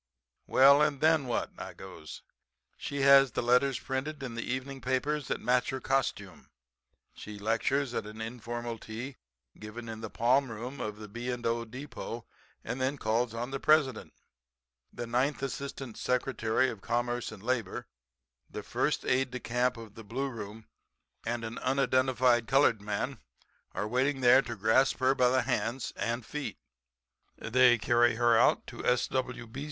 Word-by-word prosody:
"'Well 140 Hz, +2 st, +7 dB
and 150 Hz, -2 st, +2 dB
then 155 Hz, -3 st, +3 dB
what?' 120 Hz, -, -1 dB
I -, -, -7 dB
goes. -, -, -10 dB, 0.5 s
'She 140 Hz, -1 st, -4 dB
has 135 Hz, -1 st, +7 dB
the -, -, -1 dB
letters 125 Hz, +2 st, +3 dB
printed 140 Hz, +2 st, -4 dB
in 125 Hz, -3 st, -5 dB
the 115 Hz, -, -4 dB
evening 130 Hz, +2 st, -4 dB
papers 135 Hz, +3 st, -1 dB
that -, -, -2 dB
match 125 Hz, 0 st, +1 dB
her 130 Hz, -, -3 dB
costume, 110 Hz, -9 st, -2 dB, 0.6 s
she 105 Hz, -1 st, -9 dB
lectures 120 Hz, +5 st, 0 dB
at 105 Hz, -, -3 dB
an 110 Hz, +1 st, -10 dB
informal 120 Hz, 0 st, -5 dB
tea 120 Hz, +6 st, -7 dB, 0.4 s
given 110 Hz, +2 st, -8 dB
in 110 Hz, -1 st, -6 dB
the 110 Hz, -, -5 dB
palm 130 Hz, +5 st, +2 dB
room 120 Hz, +5 st, -6 dB
of 105 Hz, -1 st, -4 dB
the 105 Hz, 0 st, -9 dB
B. 120 Hz, +4 st, -4 dB
& 120 Hz, -1 st, -6 dB
O. 115 Hz, 0 st, 0 dB
Depot 120 Hz, -1 st, -7 dB, 0.4 s
and 130 Hz, -, -4 dB
then 135 Hz, +2 st, 0 dB
calls 115 Hz, 0 st, 0 dB
on 120 Hz, +3 st, -4 dB
the 135 Hz, -, -3 dB
President. 145 Hz, -7 st, +2 dB, 0.8 s
The 120 Hz, -, -5 dB
ninth 130 Hz, +4 st, 0 dB
Assistant 135 Hz, -3 st, -5 dB
Secretary 125 Hz, -1 st, +1 dB
of 105 Hz, -, -10 dB
Commerce 120 Hz, +1 st, -1 dB
and 105 Hz, -2 st, -11 dB
Labor, 120 Hz, -5 st, -2 dB, 0.6 s
the -, -, -6 dB
first -, -, -1 dB
aide 130 Hz, +1 st, +2 dB
de 125 Hz, 0 st, -5 dB
camp 125 Hz, +1 st, 0 dB
of 115 Hz, -3 st, -10 dB
the 115 Hz, -, -11 dB
Blue 130 Hz, +6 st, -3 dB
Room 110 Hz, -2 st, -8 dB, 0.6 s
and 120 Hz, 0 st, -2 dB
an 110 Hz, +1 st, -6 dB
unidentified 130 Hz, -2 st, +2 dB
colored 135 Hz, -6 st, +4 dB
man 105 Hz, +5 st, -3 dB, 0.5 s
are 105 Hz, -, -2 dB
waiting 130 Hz, +4 st, 0 dB
there 125 Hz, +2 st, +7 dB
to 120 Hz, -3 st, -6 dB
grasp 110 Hz, +6 st, +3 dB
her 130 Hz, 0 st, +3 dB
by 125 Hz, -2 st, +3 dB
the 130 Hz, +1 st, +2 dB
hands 115 Hz, +4 st, -2 dB
and 115 Hz, 0 st, -2 dB
feet. 150 Hz, -1 st, -5 dB, 0.8 s
They 125 Hz, +1 st, +4 dB
carry 120 Hz, +1 st, +3 dB
her 120 Hz, 0 st, +4 dB
out -, -, +4 dB
to -, -, -8 dB
S.W. 125 Hz, 0 st, 0 dB
B. 115 Hz, +4 st, -9 dB
125 Hz, 165 wpm, -30 LUFS, 115-135 Hz, 0.8 s, Well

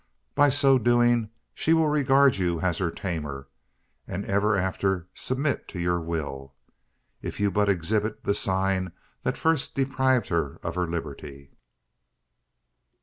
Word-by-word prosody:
By 145 Hz, 0 st, +5 dB
so 135 Hz, -1 st, +5 dB
doing, 120 Hz, -1 st, +3 dB, 0.2 s
she 160 Hz, -, +1 dB
will 160 Hz, -1 st, +3 dB
regard 140 Hz, -3 st, +4 dB
you 85 Hz, -3 st, 0 dB
as 90 Hz, -3 st, 0 dB
her 90 Hz, -, 0 dB
tamer; 75 Hz, -7 st, -5 dB, 0.6 s
and 100 Hz, -, -4 dB
ever 100 Hz, +1 st, +1 dB
after 95 Hz, -1 st, -1 dB
submit 135 Hz, +3 st, -2 dB
to 90 Hz, -, -7 dB
your 85 Hz, 0 st, 0 dB
will, 70 Hz, -5 st, -5 dB, 0.7 s
if -, -, -6 dB
you 100 Hz, -1 st, +2 dB
but 105 Hz, +2 st, +2 dB
exhibit 105 Hz, +4 st, 0 dB
the 100 Hz, -, +1 dB
sign 95 Hz, -2 st, 0 dB, 0.3 s
that -, -, -2 dB
first 160 Hz, -4 st, 0 dB
deprived 130 Hz, -2 st, +1 dB
her 80 Hz, -5 st, -1 dB
of 80 Hz, -, -3 dB
her 90 Hz, 0 st, -1 dB
liberty." 70 Hz, -4 st, -7 dB
95 Hz, 140 wpm, -26 LUFS, 85-125 Hz, 0.7 s, By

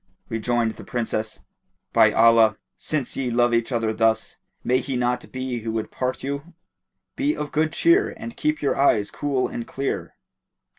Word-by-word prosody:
Rejoined 115 Hz, 0 st, 0 dB
the -, -, -9 dB
Princess, 110 Hz, -2 st, -3 dB, 0.5 s
"By -, -, +6 dB
Allah, 115 Hz, -1 st, +5 dB, 0.2 s
since 145 Hz, -5 st, -3 dB
ye 130 Hz, -2 st, -1 dB
love 120 Hz, 0 st, +2 dB
each 115 Hz, +2 st, +1 dB
other 115 Hz, -2 st, 0 dB
thus, 110 Hz, 0 st, +1 dB, 0.2 s
may 125 Hz, +1 st, +2 dB
he 135 Hz, 0 st, -3 dB
not 125 Hz, 0 st, -1 dB
be 130 Hz, -2 st, -3 dB
who 115 Hz, 0 st, -4 dB
would 110 Hz, -1 st, -3 dB
part 130 Hz, 0 st, -3 dB
you! 140 Hz, +5 st, -5 dB, 0.6 s
Be 290 Hz, +2 st, 0 dB
of 150 Hz, -, -4 dB
good 155 Hz, +1 st, +1 dB
cheer 345 Hz, -, +3 dB
and 235 Hz, -, -7 dB
keep 305 Hz, +1 st, -1 dB
your -, -, +2 dB
eyes 110 Hz, -7 st, +3 dB
cool 140 Hz, -3 st, -1 dB
and 120 Hz, -, -6 dB
clear." 135 Hz, +1 st, -3 dB
125 Hz, 165 wpm, -23 LUFS, 115-140 Hz, 0.6 s, By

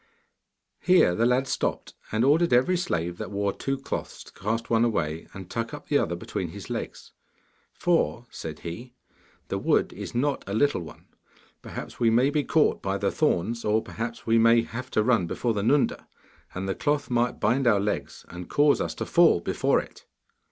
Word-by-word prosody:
Here 180 Hz, -, +4 dB
the 115 Hz, +6 st, +2 dB
lad 130 Hz, +2 st, +2 dB
stopped, -, -, -2 dB, 0.2 s
and 110 Hz, +3 st, +2 dB
ordered 160 Hz, +4 st, +3 dB
every 125 Hz, +9 st, +4 dB
slave 85 Hz, -, -2 dB
that -, -, -5 dB
wore 100 Hz, -1 st, -1 dB
two 135 Hz, 0 st, -2 dB
cloths 135 Hz, -, -5 dB
to -, -, -17 dB
cast 115 Hz, +3 st, -3 dB
one 115 Hz, 0 st, +3 dB
away 85 Hz, -9 st, -1 dB
and 95 Hz, -2 st, -9 dB
tuck 115 Hz, +5 st, -4 dB
up 145 Hz, -, -13 dB
the 145 Hz, -, +4 dB
other 85 Hz, -, -1 dB
between 85 Hz, -, -4 dB
his -, -, -9 dB
legs. -, -, -6 dB, 0.6 s
'For,' 165 Hz, -8 st, 0 dB
said 80 Hz, -2 st, -7 dB
he, 120 Hz, +9 st, -8 dB, 0.5 s
'the -, -, -2 dB
wood -, -, +1 dB
is -, -, -7 dB
not 140 Hz, +3 st, 0 dB
a 100 Hz, -, -2 dB
little 145 Hz, -4 st, +2 dB
one. 75 Hz, -3 st, -11 dB, 0.6 s
Perhaps -, -, -8 dB
we 115 Hz, -, +4 dB
may 125 Hz, +5 st, +3 dB
be 150 Hz, -1 st, +1 dB
caught 155 Hz, +1 st, +2 dB
by 95 Hz, 0 st, -1 dB
the 100 Hz, 0 st, 0 dB
thorns, 115 Hz, -, 0 dB
or 110 Hz, +1 st, +1 dB
perhaps 115 Hz, +1 st, -6 dB
we 115 Hz, 0 st, +3 dB
may 115 Hz, 0 st, +5 dB
have 125 Hz, +2 st, -7 dB
to 110 Hz, -, +1 dB
run 110 Hz, -7 st, +2 dB
before 115 Hz, +7 st, -1 dB
the 105 Hz, -, -1 dB
Nunda, 135 Hz, +7 st, +1 dB, 0.5 s
and 95 Hz, +1 st, -3 dB
the 95 Hz, -, 0 dB
cloth 145 Hz, +5 st, -1 dB
might 120 Hz, 0 st, +1 dB
bind 125 Hz, +4 st, +2 dB
our 105 Hz, -4 st, +4 dB
legs, 105 Hz, +1 st, -3 dB
and 90 Hz, 0 st, -9 dB
cause 145 Hz, 0 st, +3 dB
us -, -, -3 dB
to -, -, -4 dB
fall 170 Hz, -, +5 dB
before 85 Hz, -, +1 dB
it. -, -, -11 dB
115 Hz, 195 wpm, -26 LUFS, 100-135 Hz, 0.6 s, may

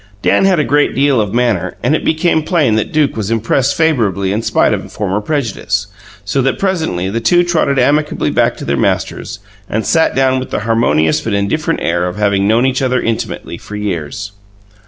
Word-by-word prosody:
Dan -, -, +3 dB
had 190 Hz, -2 st, +3 dB
a -, -, +2 dB
great 145 Hz, +1 st, +1 dB
deal 135 Hz, -3 st, +3 dB
of 105 Hz, -2 st, -2 dB
manner, 120 Hz, -5 st, 0 dB
and -, -, +2 dB
it -, -, -2 dB
became 160 Hz, 0 st, +1 dB
plain 155 Hz, -7 st, +1 dB
that 110 Hz, -1 st, -1 dB
Duke 150 Hz, -2 st, +1 dB
was 110 Hz, -2 st, -3 dB
impressed 115 Hz, +4 st, 0 dB
favourably 110 Hz, -, +1 dB
in 110 Hz, -, -1 dB
spite -, -, +2 dB
of -, -, -5 dB
former 105 Hz, 0 st, -2 dB
prejudice, 105 Hz, -6 st, -2 dB, 0.4 s
so 135 Hz, +7 st, 0 dB
that 135 Hz, +1 st, 0 dB
presently 160 Hz, -, -1 dB
the 115 Hz, -, -1 dB
two 175 Hz, +10 st, +3 dB
trotted 165 Hz, -5 st, 0 dB
amicably 145 Hz, +4 st, +1 dB
back -, -, +1 dB
to -, -, -7 dB
their -, -, 0 dB
masters -, -, -2 dB, 0.3 s
and 110 Hz, +1 st, -2 dB
sat 160 Hz, -1 st, +2 dB
down 130 Hz, 0 st, +2 dB
with 130 Hz, -, -6 dB
the -, -, -2 dB
harmonious 105 Hz, -9 st, +1 dB
but 110 Hz, -, -3 dB
indifferent 155 Hz, +12 st, -1 dB
air 85 Hz, +1 st, 0 dB
of 90 Hz, -, -5 dB
having 100 Hz, -1 st, +1 dB
known 115 Hz, +4 st, +3 dB
each 130 Hz, 0 st, 0 dB
other 130 Hz, -1 st, +1 dB
intimately 110 Hz, -6 st, -4 dB
for 105 Hz, -, -9 dB
years. 100 Hz, 0 st, -4 dB
115 Hz, 200 wpm, -15 LUFS, 100-145 Hz, 0.4 s, Dan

